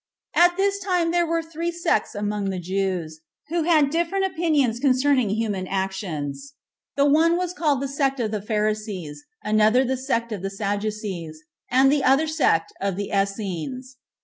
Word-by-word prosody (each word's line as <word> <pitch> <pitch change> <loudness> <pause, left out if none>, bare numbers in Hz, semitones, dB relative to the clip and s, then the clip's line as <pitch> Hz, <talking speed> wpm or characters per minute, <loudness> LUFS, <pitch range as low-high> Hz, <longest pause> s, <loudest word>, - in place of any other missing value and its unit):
9. 350 - +7
At 350 - -14
this 400 0 +1
time 360 -3 0
there 345 0 +2
were 330 0 0
three 330 +1 -4
sects 335 -13 0
among 205 -1 -2
the 190 - -3
Jews, 180 -3 -2 0.3
who 335 -1 0
had 305 -5 +4
different 345 +4 0
opinions 305 -10 +1
concerning 260 -3 +3
human 205 -3 -2
actions; 190 - -4 0.4
the 280 - +3
one 320 +4 +4
was 360 -1 -2
called 295 -6 0
the - - -1
sect 275 -1 0
of 220 -3 -1
the 210 -2 -2
Pharisees, 210 -8 -2 0.2
another 215 +4 +3
the 260 +1 -1
sect 235 -3 -2
of 205 -4 -4
the 195 - -3
Sadducees, 200 -5 -4 0.3
and 265 +2 +5
the 285 -2 +2
other 270 +4 +4
the 310 - -4
sect 255 - +2
of 195 -1 -1
the 200 +1 -4
Essens. 200 - -3
240 Hz, 175 wpm, -23 LUFS, 200-310 Hz, 0.4 s, 9